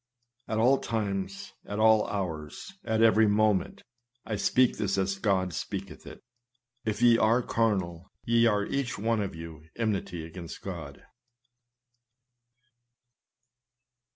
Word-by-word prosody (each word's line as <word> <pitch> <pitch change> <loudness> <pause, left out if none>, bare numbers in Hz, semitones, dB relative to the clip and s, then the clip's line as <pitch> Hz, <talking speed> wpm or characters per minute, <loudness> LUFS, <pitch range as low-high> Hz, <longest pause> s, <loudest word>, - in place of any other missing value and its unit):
At 110 - -2
all 125 +5 +4
times, 100 -4 -3
at 105 - -4
all 110 0 +4
hours, 85 - -5
at 110 -1 +1
every 110 -1 +5
moment, 105 -1 +1 0.4
(I 110 - -2
speak 125 +5 +2
this 100 -2 -1
as 95 0 -1
God 95 -4 +1
speaketh 95 +3 -6
it,) - - -11 0.6
if 110 +2 -2
ye 120 -1 +6
are 115 +3 +3
carnal, 95 -8 -1 0.2
ye 115 0 +4
are 105 -2 +1
each 140 0 -2
one 110 +1 0
of 100 -4 -4
you 80 -2 -9
enmity 100 -7 -2
against 85 +1 -9
God. - - -7
105 Hz, 125 wpm, -28 LUFS, 95-115 Hz, 0.6 s, ye